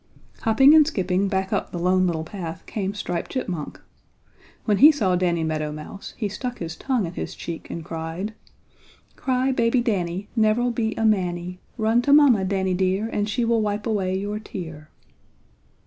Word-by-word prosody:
Hopping 265 +6 +5
and 310 -2 +7
skipping 190 - 0
back 190 +1 -1
up 200 - -1
the - - -4
Lone 185 +1 +2
Little 160 -2 -1
Path 165 -2 -7
came 200 -1 -3
Striped 175 -4 -3
Chipmunk. 185 - -4 0.9
When 210 -3 +2
he 300 +4 +10
saw 200 -11 +1
Danny 175 -2 +1
Meadow 155 -1 -2
Mouse 155 +6 -9
he 220 - -1
stuck 245 +5 -5
his 165 -2 -5
tongue 250 -3 -1
in 170 - -6
his - - -5
cheek 170 -2 -7
and 165 -2 -6
cried: 165 +6 -5 0.8
"Cry 260 0 0
baby 235 -1 +2
Danny 195 -5 -1
Never'll 225 +2 +2
be 225 -2 -1
a 225 - 0
manny! 180 -3 0 0.2
Run 225 +2 +3
to 280 +3 +3
mamma, 275 -9 +6
Danny 190 -1 0
dear, 190 +4 0
And 210 -1 -1
she 240 +2 0
will 230 -1 +2
wipe 210 0 -2
away 190 -5 0
your 205 +2 -3
tear!" 160 -7 -8
195 Hz, 175 wpm, -24 LUFS, 175-225 Hz, 0.9 s, he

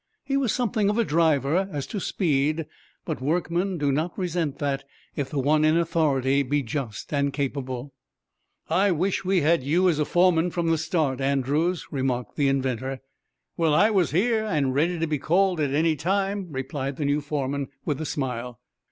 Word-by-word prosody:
He 275 0 -2
was 270 -5 +2
something 220 -4 +1
of 210 - 0
a 235 - +3
driver, 160 +2 +2
as 145 -4 -3
to 205 - -4
speed, 155 -4 0 0.4
but - - -4
workmen 175 +5 0
do 145 -2 +1
not 155 +5 -1
resent 170 -6 -2
that 140 -2 -2 0.3
if 140 -2 -2
the 150 - -4
one 150 +3 +3
in 155 +1 +4
authority 145 -5 +2
be 140 +1 0
just 125 -1 -5
and 140 -1 +1
capable. 135 -2 -4 0.7
"I 190 +5 +3
wish 185 +3 0
we 185 -1 +2
had 165 +3 +3
had - - -11
you 170 +7 +2
as 155 -3 0
foreman 175 +2 +3
from 170 -1 -1
the 165 - +1
start, 155 -5 0
Andrews," 140 +6 0
remarked 130 -3 -2
the 145 -2 +2
inventor. 130 -1 -1 0.6
"Well, 160 -3 +2
I 210 +7 +5
was 190 -6 +2
here, 220 +6 +1
and 150 -11 0
ready 165 +6 +1
to 165 - 0
be 155 -2 -1
called 180 +4 +2
at 145 -2 +1
any 155 +2 +2
time," 195 +5 -1
replied 135 0 -4
the 145 - -3
new 145 +1 +1
foreman, 140 -1 -2 0.2
with 150 -1 -1
a - - -3
smile. 125 -3 -4
155 Hz, 185 wpm, -25 LUFS, 140-175 Hz, 0.7 s, I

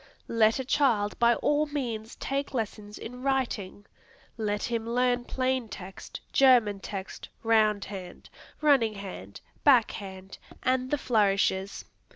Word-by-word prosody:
Let 225 -1 +3
a 265 - -3
child 240 -7 +1
by 235 0 +5
all 295 +5 +1
means 235 -6 -4
take 275 0 -3
lessons 210 -2 -4
in 250 +2 -8
writing. 240 -8 -2 0.5
Let 210 -2 -2
him 230 -1 -2
learn 245 0 +1
plain 255 -3 -1
text, 190 -1 -9
German 240 -7 +5
text, 195 -1 -7
round 215 -2 +3
hand, 185 -3 -9 0.3
running 265 -8 +4
hand, 180 - -8 0.2
back 255 -7 +5
hand, 190 -2 -9 0.2
and 255 0 +1
the 295 - +1
flourishes. 200 -5 +1
225 Hz, 130 wpm, -28 LUFS, 205-255 Hz, 0.5 s, by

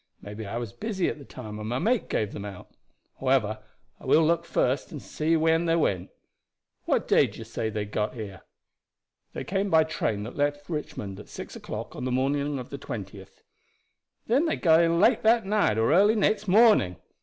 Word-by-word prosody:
Maybe 105 +1 -8
I 115 - -4
was 120 -4 -5
busy 205 -4 -2
at - - -6
the 140 - -11
time, 110 -4 -8
and 105 +1 -5
my 120 - -1
mate 230 - 0
gave 105 -2 -1
them 100 - -6
out. 100 -3 -9 0.5
However, - - +1 0.4
I - - -14
will 160 - +5
look 170 +1 +1
first 130 -2 0
and 150 - -6
see 160 +4 0
when 165 +1 +2
they 165 0 +2
went. 95 - 0 0.8
What - - +1
day - - +5
do - - -12
you 115 - -7
say 115 0 -3
they 105 -1 -3
got 105 +3 -2
here?" 100 -5 -7 0.9
"They - - -5
came 195 +1 -1
by 160 -3 +5
the 160 - -9
train 105 -2 -1
that 115 - -8
left 145 0 -1
Richmond 105 - -5
at 105 - -12
six - - -8
o'clock - - -7
on 125 - -5
the 130 - -1
morning 140 +3 0
of 125 - -8
the 140 - -6
20th." 100 -5 -8 0.8
"Then 270 +9 +2
they - - +1
got 165 -2 +4
in 170 0 +2
late - - +4
that 225 -1 +4
night 200 - +2
or 115 +6 +3
early 205 +5 +5
next 210 0 +1
morning. 205 - +5
145 Hz, 205 wpm, -26 LUFS, 110-170 Hz, 0.9 s, will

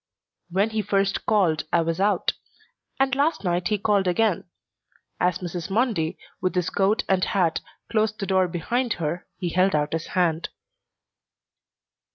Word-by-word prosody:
When 195 +5 +1
he 220 -1 0
first 195 0 0
called 180 -8 +2
I 170 - +4
was 165 +1 -1
out, 205 +1 +2 0.7
and 265 -1 +2
last 285 +2 +1
night 175 -1 0
he 210 - +1
called 200 -1 +2
again. 195 0 +1 0.7
As 180 0 +2
Mrs. 175 -2 -5
Mundy, 195 -6 0 0.2
with 185 0 0
his 180 -1 0
coat 200 +3 +2
and 190 -1 +2
hat, 180 -7 +1 0.3
closed 215 -1 +1
the 195 - -2
door 190 -1 +2
behind 230 +8 -1
her, 170 +2 -3
he 180 -3 -2
held 185 +1 +2
out 150 0 0
his 165 0 -2
hand. 170 -2 +1
190 Hz, 155 wpm, -24 LUFS, 175-210 Hz, 0.7 s, I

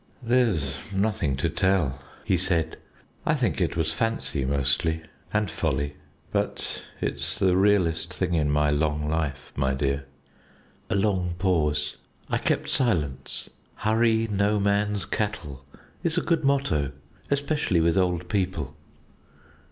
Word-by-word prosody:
"There's 115 - +1
nothing 95 -8 0
to 65 - 0
tell," 85 -9 +1 0.2
he 95 - +3
said. 85 -3 +1 0.5
"I - - +2
think - - 0
it - - 0
was 80 -1 +1
fancy, 115 -7 0
mostly, 70 +4 +1 0.3
and 105 -4 0
folly; 70 -3 -1 0.4
but - - -1 0.2
it's - - +1
the 95 -2 +3
realest 90 -4 +3
thing 90 -1 -1
in 75 -3 +2
my 75 0 +3
long 75 0 +1
life, 75 -2 -2
my 65 0 +1
dear." 70 0 -1 0.8
A - - +1
long 95 -4 +1
pause. 75 -5 +1 0.3
I - - +2
kept - - 0
silence. 80 - -1 0.2
"Hurry 110 +1 +2
no 105 0 +1
man's 100 0 +1
cattle" 75 -11 -3 0.4
is 165 0 0
a - - +3
good 165 -2 +1
motto, 135 - +1 0.4
especially 140 - +1
with 80 0 +3
old 90 -2 +1
people. 90 -7 -1
90 Hz, 130 wpm, -26 LUFS, 75-105 Hz, 0.8 s, he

